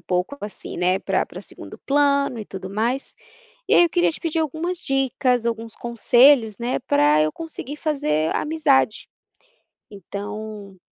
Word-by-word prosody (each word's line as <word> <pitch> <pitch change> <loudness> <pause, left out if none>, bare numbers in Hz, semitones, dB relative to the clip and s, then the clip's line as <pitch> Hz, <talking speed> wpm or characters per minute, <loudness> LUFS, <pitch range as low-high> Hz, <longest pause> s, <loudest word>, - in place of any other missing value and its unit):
pouco 180 +9 -2
assim, 205 0 -7
né, 180 +2 +2
para - - 0
para - - -9
segundo - - -9
plano 280 -3 +1
e 215 - -5
tudo 190 -1 -8
mais, 235 +7 -2 0.5
e - - +4
aí - - +7
eu 340 - +2
queria 350 -1 +2
te - - -9
pedir 330 -1 -2
algumas 320 +3 -2
dicas, 265 -5 0
alguns 225 -1 -3
conselhos, 240 -1 +4
né, 240 +1 -1
para 145 - +3
eu 155 - 0
conseguir 310 -3 -7
fazer 160 - 0
amizade. 295 -7 +1 0.8
Então 205 0 -8
240 Hz, 150 wpm, -22 LUFS, 200-285 Hz, 0.8 s, aí